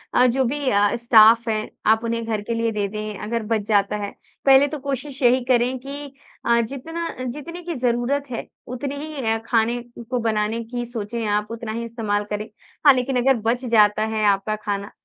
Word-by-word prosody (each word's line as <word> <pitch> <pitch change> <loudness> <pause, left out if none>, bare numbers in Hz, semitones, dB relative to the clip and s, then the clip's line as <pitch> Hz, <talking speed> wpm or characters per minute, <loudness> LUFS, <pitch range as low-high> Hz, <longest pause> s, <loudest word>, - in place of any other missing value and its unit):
अ, 250 - +6
जो 255 +2 +2
भी 280 +2 -1
अ, 205 -1 +3
स्टाफ़ 230 -1 +6
है, 215 -1 -1 0.2
आप 220 +1 +4
उन्हें 230 0 -2
घर 220 -2 -2
के 220 +3 -3
लिए 230 0 0
दे 205 -2 -1
दें 215 0 -5
अगर 230 +1 -2
बच 220 0 0
जाता 205 -1 +2
है। 205 -1 -4 0.3
पहले 270 +1 +7
तो 295 +1 -5
कोशिश 275 +1 -4
यही 250 +1 +4
करें 250 0 +2
कि 280 +2 -7 0.3
अ, 235 0 +4
जितना 320 +8 -5 0.2
जितने 300 +8 -6
की 345 0 -4
ज़रूरत 250 +3 0
है 235 - -4 0.2
उतनी 270 +3 -4
ही 305 -3 -6
अ, 225 - +2
खाने 235 +1 +1 0.3
को 250 -1 0
बनाने 220 0 -1
की 240 +1 -5
सोचें 230 -1 -4
आप, 210 0 0
उतना 230 -1 -5
ही 230 +1 -3
इस्तेमाल 220 -3 -2
करें। 210 +1 -4 0.4
हाँ, 285 - +9
लेकिन 255 0 0
अगर 270 +2 +4 0.2
बच 245 +2 -1
जाता 215 -2 +4
है 215 - 0
आपका 200 +1 +1
खाना, 205 -1 -4
235 Hz, 200 wpm, -22 LUFS, 215-260 Hz, 0.4 s, हाँ